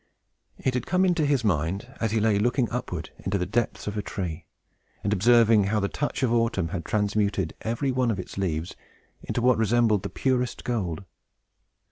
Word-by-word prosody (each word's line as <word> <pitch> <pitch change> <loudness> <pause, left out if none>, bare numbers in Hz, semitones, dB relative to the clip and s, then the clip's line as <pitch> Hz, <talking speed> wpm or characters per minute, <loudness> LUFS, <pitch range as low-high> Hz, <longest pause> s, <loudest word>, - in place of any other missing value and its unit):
It 130 - -1
had 125 -2 -2
come 185 +1 +3
into 175 -5 +2
his 140 -4 +2
mind 95 - -1
as 115 - +1
he 110 +1 +1
lay 105 -1 +2
looking 120 +3 +2
upward 90 -10 -4
into 95 +1 -1
the 90 - -1
depths 115 +5 -1
of 105 - -3
a 105 - -1
tree, 85 -5 -5 0.6
and 105 - +1
observing 115 0 +5
how 105 +2 +1
the 100 - 0
touch 145 -1 -2
of 120 -2 +2
Autumn 115 -7 +1
had 85 -1 -4
transmuted 105 -4 0
every 120 +4 -1
one 125 -1 +1
of 110 - 0
its 90 - -7
green 95 -1 -1
leaves 80 +2 -4 0.5
into 120 - -3
what 125 -2 +4
resembled 110 -2 +3
the - - -4
purest 125 -2 -1
gold. 100 -7 -2
110 Hz, 190 wpm, -26 LUFS, 95-120 Hz, 0.6 s, observing